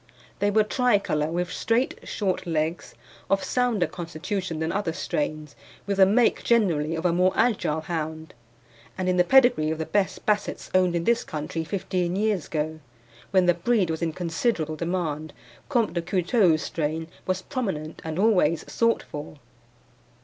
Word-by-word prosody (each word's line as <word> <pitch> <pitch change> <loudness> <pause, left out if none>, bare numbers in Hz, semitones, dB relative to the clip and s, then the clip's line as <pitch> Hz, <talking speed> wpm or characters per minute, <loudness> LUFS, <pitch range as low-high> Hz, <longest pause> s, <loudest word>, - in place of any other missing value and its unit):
They 205 +2 +2
were 215 +1 +4
tricolour, 205 - +1
with 175 +2 -2
straight, 235 +3 0
short 190 -4 -2
legs, 160 0 -2 0.3
of 195 0 +2
sounder 245 -7 +1
constitution 175 +1 -4
than 160 +1 -1
other 190 -5 -1
strains, 150 -1 -3 0.3
with 200 0 -1
the 190 -1 +7
make 225 +4 +3
generally 165 -9 +2
of 160 +2 -4
a 175 - +3
more 180 +2 +3
agile 175 -10 +1
hound, 160 -1 -4 0.6
and 185 -1 -2
in 180 0 +2
the 180 - +6
pedigree 245 -9 +4
of 160 - -1
the 160 - -3
best 200 +1 -1
Bassets 210 -1 -1
owned 185 -2 +3
in 170 - 0
this 235 +4 +2
country 155 +1 -4
fifteen 180 0 -2
years 205 -4 0
ago, 155 0 -3 0.5
when 185 -1 +3
the 175 - +5
breed 185 0 +1
was 160 - -4
in 165 -1 0
considerable 165 -1 -1
demand, 155 -2 -3 0.4
Comte 240 -6 +1
de 170 - -1
Couteulx's 180 -1 +2
strain 160 +1 -2 0.2
was 185 0 -1
prominent 190 - -4
and 160 0 -4
always 185 -6 +3
sought 230 0 +2
for. 150 +1 -8
175 Hz, 160 wpm, -25 LUFS, 160-205 Hz, 0.6 s, the